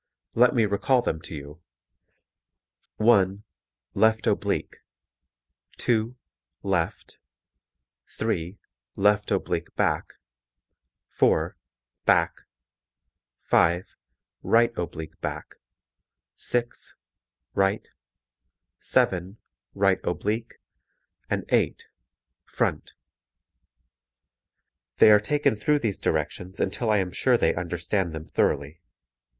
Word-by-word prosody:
Let 125 Hz, +2 st, +4 dB
me 115 Hz, -3 st, +4 dB
recall 120 Hz, +5 st, +2 dB
them 80 Hz, -, -2 dB
to 80 Hz, -, -8 dB
you: 75 Hz, +3 st, -10 dB, 1.3 s
(1) 100 Hz, -3 st, +3 dB, 0.5 s
left 110 Hz, +2 st, +3 dB
oblique, -, -, -1 dB, 1.0 s
(2) 115 Hz, +1 st, 0 dB, 0.5 s
left, 90 Hz, -4 st, -2 dB, 0.9 s
(3) 85 Hz, +4 st, -3 dB, 0.4 s
left 105 Hz, +1 st, +2 dB
oblique -, -, -2 dB
back, -, -, 0 dB, 1.0 s
(4) -, -, +2 dB, 0.5 s
back, -, -, +4 dB, 1.1 s
(5) 85 Hz, +2 st, +2 dB, 0.5 s
right 115 Hz, 0 st, +3 dB
oblique 80 Hz, -3 st, -6 dB
back, -, -, -5 dB, 0.8 s
(6) 120 Hz, -1 st, -3 dB, 0.6 s
right, 95 Hz, +2 st, +1 dB, 0.9 s
(7) 95 Hz, +3 st, 0 dB, 0.4 s
right -, -, +3 dB
oblique, 110 Hz, +3 st, -2 dB, 0.8 s
and -, -, -1 dB
(8) -, -, +1 dB, 0.6 s
front. -, -, -2 dB, 2.0 s
They 110 Hz, -, +8 dB
are 105 Hz, -, +7 dB
taken 145 Hz, +2 st, +1 dB
through 150 Hz, +8 st, +2 dB
these 110 Hz, -8 st, -2 dB
directions 90 Hz, +2 st, -2 dB
until 110 Hz, +4 st, -1 dB
I 105 Hz, -, +4 dB
am 95 Hz, -2 st, -1 dB
sure 125 Hz, +6 st, +2 dB
they 80 Hz, -, +2 dB
understand 85 Hz, +1 st, -2 dB
them 80 Hz, 0 st, -6 dB
thoroughly. 70 Hz, +3 st, -1 dB
100 Hz, 90 wpm, -26 LUFS, 85-110 Hz, 2.0 s, They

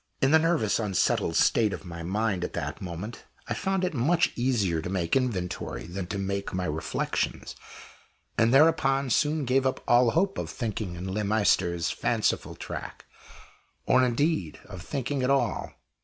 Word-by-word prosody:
In 135 Hz, -, +3 dB
the 160 Hz, -, +7 dB
nervous 160 Hz, -11 st, +1 dB
unsettled 100 Hz, -5 st, +1 dB
state 110 Hz, -4 st, +3 dB
of -, -, -7 dB
my 85 Hz, -1 st, -7 dB
mind 95 Hz, +1 st, -1 dB
at -, -, -4 dB
that 75 Hz, +3 st, -4 dB
moment, 95 Hz, +5 st, -7 dB, 0.2 s
I -, -, -1 dB
found 190 Hz, 0 st, -1 dB
it 180 Hz, -, 0 dB
much 160 Hz, +7 st, +2 dB
easier 110 Hz, -10 st, +1 dB
to 85 Hz, -, -5 dB
make 90 Hz, -3 st, -2 dB
my 135 Hz, -, +5 dB
inventory 95 Hz, -8 st, -4 dB
than 90 Hz, +1 st, -5 dB
to 100 Hz, -, -4 dB
make 100 Hz, 0 st, -3 dB
my 90 Hz, -1 st, -1 dB
reflections, 80 Hz, -1 st, -2 dB, 0.8 s
and 115 Hz, 0 st, +3 dB
thereupon 135 Hz, -2 st, +4 dB
soon 150 Hz, +3 st, +1 dB
gave 130 Hz, +2 st, +2 dB
up 130 Hz, -, -3 dB
all 120 Hz, 0 st, +5 dB
hope 195 Hz, -, +1 dB
of -, -, -4 dB
thinking 105 Hz, -6 st, -4 dB
in 95 Hz, +2 st, -5 dB
Le 105 Hz, +1 st, -1 dB
Maistre's 95 Hz, -5 st, +1 dB
fanciful -, -, -1 dB
track -, -, -7 dB, 0.8 s
or, 130 Hz, 0 st, +4 dB
indeed, 125 Hz, -, 0 dB
of 95 Hz, -3 st, -9 dB
thinking 135 Hz, +5 st, -3 dB
at 130 Hz, -, +1 dB
all. 140 Hz, 0 st, 0 dB
110 Hz, 170 wpm, -27 LUFS, 90-135 Hz, 0.8 s, the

